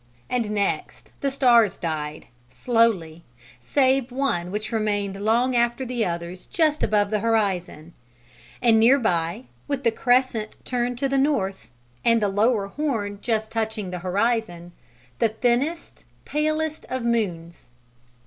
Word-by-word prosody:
And 240 -4 0
next 205 -1 -2
the 280 - +1
stars 240 -7 +4
died, 155 -3 -4 0.2
slowly, 195 - +1 0.4
save 260 - +1
one 245 -10 -1
which 210 +4 -4
remained 205 -3 -1
long 240 +4 +2
after 240 +2 +1
the 245 -2 -1
others 170 +1 -5
just 310 -3 +1
above 205 -1 +2
the 215 - +1
horizon; 190 -7 -1 0.7
and 225 -2 +5
near 240 +5 +6
by, 170 - -1 0.2
with 280 -1 -2
the 230 - +3
crescent 245 -2 +1
turned 245 -1 -1
to 275 - 0
the 270 0 +1
north, 200 - 0 0.3
and 230 0 +4
the 205 -2 +1
lower 210 +1 +2
horn 215 -7 -2
just 220 -2 -1
touching 220 -4 -2
the 180 - -4
horizon, 185 -2 -1 0.5
the 230 - +3
thinnest, 250 +9 -1 0.2
palest 310 +1 -1
of 255 -1 -3
moons. 175 - -2
225 Hz, 135 wpm, -24 LUFS, 195-250 Hz, 0.7 s, near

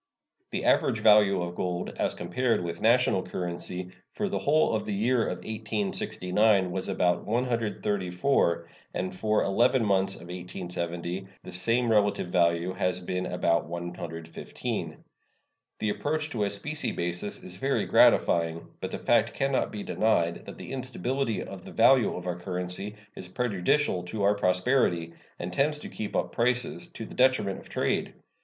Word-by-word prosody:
The - - -3
average - - +3
value 105 -4 +5
of 85 0 -4
gold, 90 0 -3
as - - 0
compared 125 -6 0
with 85 -1 -5
national 120 -4 +4
currency, 90 +1 -4 0.2
for 205 -1 -2
the - - -1
whole 155 -3 +3
of 110 - -1
the 105 - -1
year 115 +3 +2
1869 105 -2 0
was 95 +1 -3
about 90 -1 +1
134, 105 -5 0 0.3
and 95 0 -2
for 105 +2 +1
eleven 120 +4 +3
months 95 -1 +2
of - - -12
1870 90 0 -5 0.2
the - - -9
same 115 +6 +1
relative 105 -4 +2
value 85 +1 +2
has 90 -1 0
been 90 0 -3
about 85 -2 +1
115. 85 -1 -5 0.7
The 110 - -1
approach 145 +9 -2
to 110 -5 0
a - - 0
specie 145 +11 -3
basis 90 +3 -2
is 90 0 -6
very 135 +6 0
gratifying, 85 -1 +3
but - - -3
the - - -4
fact 115 -1 +2
can 135 0 0
not 130 - 0
be 105 -1 -5
denied 85 -6 +1
that - - -8
the - - -8
instability 130 -1 -2
of 95 -2 -9
the - - -10
value 120 +2 +5
of 90 - -6
our 90 -1 -3
currency 90 +3 -4 0.2
is 90 - -6
prejudicial 100 +2 +1
to 100 +3 -3
our 100 +1 +5
prosperity, 90 -3 +1 0.2
and 90 +1 -5
tends 150 +5 +2
to - - -8
keep 110 - -5
up - - 0
prices, 125 +7 0
to 140 -10 -8
the - - -11
detriment 125 -7 +2
of - - -15
trade. - - -1
100 Hz, 160 wpm, -28 LUFS, 90-115 Hz, 0.7 s, value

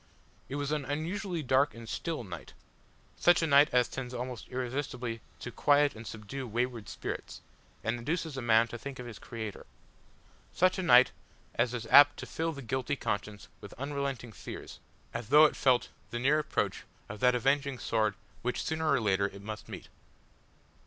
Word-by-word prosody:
It 135 - -4
was 145 0 -2
an 150 -2 0
unusually 165 +5 -3
dark 130 +1 +3
and 115 0 -10
still 160 +1 -3
night; 90 -5 -9 0.6
such 175 -1 +4
a - - +4
night 145 0 +6
as 125 -1 +4
tends 130 -1 -6
almost 125 0 -5
irresistibly 125 -2 -3 0.2
to 125 - -5
quiet 145 +2 +3
and 110 +1 -10
subdue 125 +5 -6
wayward 120 0 -2
spirits, - - -6 0.4
and 115 +2 -1
induces 160 +4 -2
man 115 -3 +4
to 120 - -7
think 140 +2 -7
of 125 - -7
his 120 -3 -9
Creator. 110 -4 -7 0.8
Such 185 +1 +2
a - - +1
night 125 -7 +7 0.4
as 120 +1 +1
is 115 -1 -4
apt 145 0 +8
to - - -6
fill 165 +1 -2
the 140 -3 -8
guilty 130 +4 -1
conscience 105 -4 -4
with 100 - -11
unresting 140 -3 -3
fears, - - -9 0.3
as 120 -2 -5
though 150 +3 +8
it 150 - +2
felt 130 -2 +3 0.2
the 120 - -4
near 140 +5 +3
approach 150 - -1 0.2
of 105 - -8
that 125 0 +4
avenging 135 +2 +1
sword 110 -3 0 0.3
which 125 +1 -2
sooner 160 0 -1
or 140 - +4
later 100 -2 +2
it 100 0 -11
must 110 0 -7
meet. - - -8
125 Hz, 175 wpm, -31 LUFS, 115-145 Hz, 0.8 s, apt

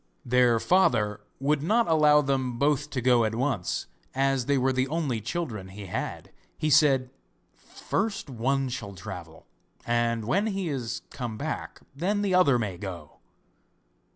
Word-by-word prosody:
Their 125 -1 +4
father 110 - +2 0.2
would 140 +1 +1
not 225 +9 +2
allow 150 -2 +5
them 130 -3 -1
both 145 +2 +1
to 130 - -3
go 125 -1 +4
at 110 0 -1
once, 125 -7 -1 0.3
as 135 -2 +1
they 140 -1 +3
were 130 0 +2
the 130 +1 +1
only 140 -7 -1
children 120 - -4
he 100 +2 -9
had. 90 - -5 0.3
He 155 - 0
said: 135 -3 +4 0.4
'First 200 -3 -3
one 135 +2 0
shall 105 -6 -6
travel, 85 -2 -9 0.4
and 115 -1 0
when 200 - +1
he 195 -4 -2
is 120 -4 -4
come 120 -4 -5
back 155 +5 -5
then 200 +7 0
the 195 -2 0
other 150 -9 +5
may 100 -6 -3
go. 90 -7 -8
130 Hz, 155 wpm, -27 LUFS, 115-150 Hz, 0.4 s, allow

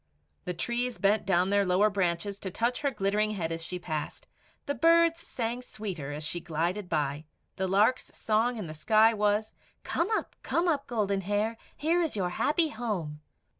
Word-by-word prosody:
The 180 - -3
trees 240 +6 -1
bent 205 0 +2
down 185 0 +3
their 200 0 +4
lower 195 +3 +3
branches 195 +1 -1
to 190 - -4
touch 235 +6 -1
her 285 - +2
glittering 210 -2 0
head 165 -4 -2
as 165 0 -4
she 180 +2 -3
passed; 155 -4 -5 0.4
the 285 - -1
birds 335 +1 +4
sang 240 -5 -3
sweeter 190 - -6
as 150 +1 -5
she 165 +3 -2
glided 175 +4 -2
by. 150 -1 -1 0.3
The 190 - 0
lark's 210 +7 +2
song 230 +3 +1
in 210 - -4
the 155 - -7
sky 215 +8 +4
was 210 0 +1 0.3
"Come 340 +4 0
up, - - -4
come 345 +2 0
up, 290 -4 0
Golden 200 -5 0
Hair; 205 +4 0 0.2
here 330 +4 +2
is 320 -8 -1
your 185 -3 0
happy 310 - +1
home." 180 - -4
205 Hz, 180 wpm, -29 LUFS, 180-240 Hz, 0.4 s, their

